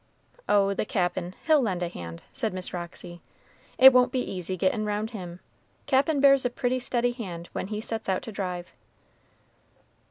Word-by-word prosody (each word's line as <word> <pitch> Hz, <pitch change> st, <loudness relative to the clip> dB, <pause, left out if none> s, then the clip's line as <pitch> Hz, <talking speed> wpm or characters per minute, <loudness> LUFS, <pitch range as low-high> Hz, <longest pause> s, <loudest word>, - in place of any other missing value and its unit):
"Oh, 200 Hz, -1 st, +4 dB
the -, -, -1 dB
Cap'n, 180 Hz, -2 st, -2 dB
he'll 310 Hz, -3 st, +5 dB
lend 185 Hz, -7 st, -1 dB
a -, -, -1 dB
hand," 85 Hz, -, -8 dB
said 215 Hz, -4 st, -2 dB
Miss 185 Hz, -1 st, -4 dB
Roxy, 175 Hz, 0 st, -7 dB, 0.6 s
"it 265 Hz, 0 st, +9 dB
won't 250 Hz, 0 st, +4 dB
be 255 Hz, -, 0 dB
easy 185 Hz, -5 st, -2 dB
gettin' 195 Hz, +5 st, +1 dB
roun' 210 Hz, 0 st, -1 dB
him; 180 Hz, -6 st, -8 dB, 0.4 s
Cap'n 280 Hz, +2 st, +2 dB
bears 275 Hz, -1 st, +6 dB
a 245 Hz, -, +1 dB
pretty 250 Hz, +1 st, -1 dB
steady 245 Hz, -1 st, 0 dB
hand 180 Hz, -8 st, -7 dB
when -, -, -3 dB
he 210 Hz, +1 st, -4 dB
sets 225 Hz, -2 st, -3 dB
out 185 Hz, -, 0 dB
to 225 Hz, -, -7 dB
drive." 180 Hz, -3 st, -5 dB
205 Hz, 170 wpm, -27 LUFS, 180-245 Hz, 0.6 s, it